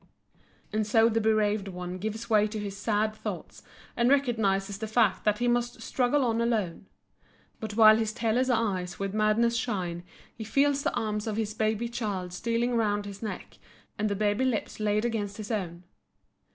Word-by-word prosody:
And 215 -1 0
so 225 +1 +5
the 225 0 +1
bereaved 215 -2 +1
one 180 -1 -6
gives 220 +3 -4
way 215 -2 +4
to 215 +1 -6
his 205 -2 -4
sad 215 +1 0
thoughts 215 - -7 0.3
and 235 0 +3
recognizes 205 -8 +1
the 220 - -3
fact 220 -3 +2
that 210 -1 +3
he 245 - 0
must 240 -1 0
struggle 260 +3 +1
on 230 -1 +1
alone. 210 -6 -1 0.7
But 215 -2 -5
while 215 -1 +8
his 220 -1 0
tearless 240 +2 0
eyes 195 -7 0
with 195 0 -3
madness 215 +2 +2
shine 185 -8 -2 0.3
he 225 - -7
feels 280 +5 +2
the - - -1
arms 210 0 -2
of 215 -1 -2
his 215 -1 -1
baby 220 +1 0
child 205 -7 -4
stealing 235 +4 -1
round 205 -2 +1
his 200 -1 -8
neck 220 - -6 0.4
and 215 0 +1
the 200 - -1
baby 205 +3 +1
lips 250 -5 -1
laid 210 +1 +1
against 205 -4 -2
his 215 +1 -6
own. 180 -5 -3
215 Hz, 180 wpm, -28 LUFS, 205-230 Hz, 0.7 s, while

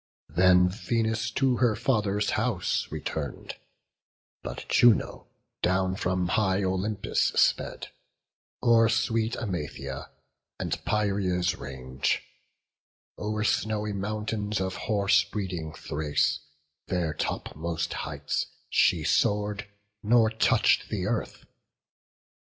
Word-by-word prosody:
Then 90 +3 +5
Venus 110 +3 -1
to 130 +2 +1
her 120 -4 +3
father's 105 -5 +1
house - - 0
return'd; 70 -5 -5 0.8
But - - -7
Juno 120 -4 +3 0.3
down 95 +1 +1
from 90 -1 -1
high 95 0 +2
Olympus 95 +2 0
sped; - - +1 0.7
O'er 115 -2 +5
sweet 115 0 +1
Emathia, 75 - -5 0.5
and - - -3
Pieria's 95 -4 +1
range, 65 -1 -2 1.0
O'er 105 0 -2
snowy 105 -1 0
mountains 105 +1 -2
of 95 0 -2
horse 100 0 +2
breeding 95 -6 -4
Thrace, 75 -1 0 0.5
Their 85 -4 -1
topmost 80 +2 -3
heights, - - -3 0.2
she - - +3
soar'd, 105 0 +1 0.3
nor 110 0 +4
touch'd 110 - +3
the - - -2
earth. - - -3
100 Hz, 95 wpm, -27 LUFS, 90-110 Hz, 1.0 s, Then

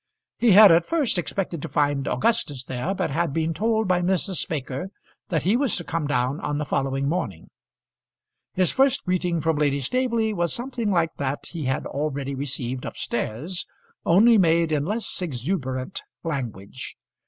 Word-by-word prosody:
He 235 -4 +5
had 205 -1 +10
at 165 +1 +5
first 280 - +1
expected 175 -3 -3
to - - -4
find 145 -1 +1
Augustus 215 - +1
there, 130 +10 -2
but 185 -5 -1
had 165 +1 0
been 165 +1 0
told 220 +4 +1
by 180 -1 +2
Mrs. 185 0 0
Baker 140 +2 -3 0.4
that 165 -6 0
he 195 +6 +3
was 255 -4 +2
to 175 - -2
come 165 -2 -2
down 135 +1 0
on 145 - -2
the 150 - -2
following 135 0 -1
morning. 145 - -3 1.0
His 185 -1 +2
first 270 +1 +2
greeting 180 -2 0
from 160 -1 +1
Lady 145 -1 +1
Staveley 230 - 0
was 175 -3 0
something 240 -3 -3
like 170 -4 +1
that 140 0 -3
he 165 -5 -5
had 130 +1 -1
already 140 -1 -3
received 130 -2 -3
up - - -6
stairs, 130 - -3 0.4
only 215 +6 +6
made 165 -2 +3
in 145 -2 +1
less 215 +1 -3
exuberant 130 -1 -3 0.2
language. 130 - -5
165 Hz, 165 wpm, -24 LUFS, 140-195 Hz, 1.0 s, had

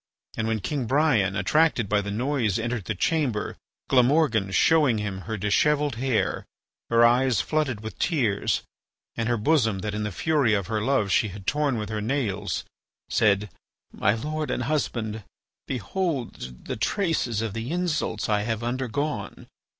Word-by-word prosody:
And 110 - -1
when 110 -2 -1
King 135 +1 -2
Brian, 130 -9 +2
attracted 125 - +2
by 105 +1 +2
the 100 - -5
noise, 115 -1 0
entered 115 -3 -3
the 105 - -2
chamber, 130 - 0 0.3
Glamorgan, 125 -5 +3
showing 140 - +4
him 100 -3 -3
her 110 - -2
dishevelled 145 +6 +2
hair, 125 -2 0 0.5
her 115 0 +5
eyes 120 -1 +3
flooded 145 -8 -1
with 110 0 -8
tears, 120 - +1 0.5
and 115 0 -1
her 120 - +2
bosom 115 -4 +2
that 105 0 -3
in 105 - -2
the 105 0 -2
fury 140 - +2
of 100 -2 -1
her 110 +1 -2
love 110 -4 +1
she 110 - +3
had 100 -1 -9
torn 145 -2 +1
with 105 -1 -4
her 110 -1 -3
nails, 105 -5 -2 0.4
said: 105 -2 +2 0.4
"My 105 - +1
lord 150 +5 -3
and 125 - -1
husband, 115 -6 -2 0.4
behold 125 - -3
the - - -4
traces 125 - 0
of 110 -3 -3
the 115 +3 -4
insults 170 -10 -1
I 105 -1 +2
have 110 +1 -2
undergone. 125 -1 -3
115 Hz, 160 wpm, -25 LUFS, 105-145 Hz, 0.5 s, her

